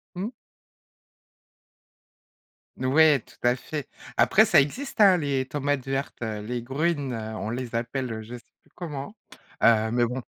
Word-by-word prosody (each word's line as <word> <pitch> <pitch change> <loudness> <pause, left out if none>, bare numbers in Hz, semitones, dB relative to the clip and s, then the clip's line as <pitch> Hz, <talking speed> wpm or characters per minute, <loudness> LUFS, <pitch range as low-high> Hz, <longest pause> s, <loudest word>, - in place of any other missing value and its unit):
Mmh. 200 +7 -3 2.5
N 130 - -2
ouais, 150 +1 +5
tout - - -20
à 120 0 +4
fait. 145 +2 -6 0.3
Après, - - +5
ça - - +6
existe, 245 - -3
hein, 190 -3 +7
les 140 -4 -1
tomates 145 -1 -2
vertes, 135 -1 -3
heu, 110 -2 -3
les 120 +3 -4
grün, 145 +1 -1
heu, 110 -1 -5
on 110 - -4
les 120 0 -4
appelle 115 -1 -3
je 120 +3 -8
sais 120 - -11 0.2
plus - - -30
comment. 155 +2 -6 0.5
Heu, 110 -1 +4
mais 120 0 +3
bon, 125 +2 -4
130 Hz, 155 wpm, -26 LUFS, 120-145 Hz, 2.5 s, hein